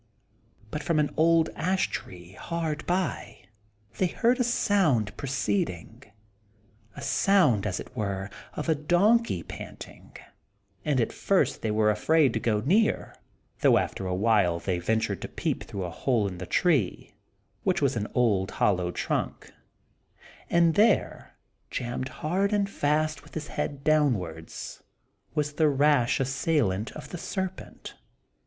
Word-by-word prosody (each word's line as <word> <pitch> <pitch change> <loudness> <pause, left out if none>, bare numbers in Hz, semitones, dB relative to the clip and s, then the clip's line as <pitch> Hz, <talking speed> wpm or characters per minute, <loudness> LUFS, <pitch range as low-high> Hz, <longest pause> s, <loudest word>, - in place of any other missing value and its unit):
But 150 - -3
from 165 +2 0
an 150 - 0
old 165 0 +3
ash 185 +4 0
tree 90 -1 -7
hard 160 - -4
by 180 -1 -2 0.6
they 185 - +3
heard 240 +8 +1
a - - +3
sound 185 - +2
proceeding, 110 -5 -2 0.9
a - - -8
sound, 150 - +3
as 95 - -2
it - - -10
were, 100 -3 -3 0.2
of 150 - -4
a 160 - +4
donkey 175 - +2
panting; - - -10 0.7
and 145 -4 +1
at 115 - 0
first 195 -2 +1
they 110 - -1
were 105 0 +3
afraid 140 +5 +3
to 110 - 0
go 110 -2 0
near, 205 - +1 0.4
though - - +5
after 95 - -2
a 90 - -1
while 100 -4 +2
they 90 0 -2
ventured 110 +5 -1
to - - -4
peep - - -3
through 100 -2 -5
a 90 - -4
hole 110 +2 0
in 90 -2 -7
the - - -6
tree, 145 - +1 0.5
which - - +1
was - - +1
an 105 - -2
old 105 -7 +2
hollow 90 -3 +1
trunk; - - -3 1.0
and 170 -1 +4
there, 210 +3 +1 0.3
jammed 125 +2 -3
hard 190 +9 -1
and 200 -1 +1
fast 155 0 0
with - - -17
his 155 -1 -5
head 140 -1 -4
downwards, 105 - -1 0.5
was 150 0 0
the 155 0 +3
rash 140 -3 +3
assailant 130 - 0
of 150 - -9
the 175 - -6
serpent. 190 0 -5
140 Hz, 145 wpm, -27 LUFS, 105-165 Hz, 1.0 s, though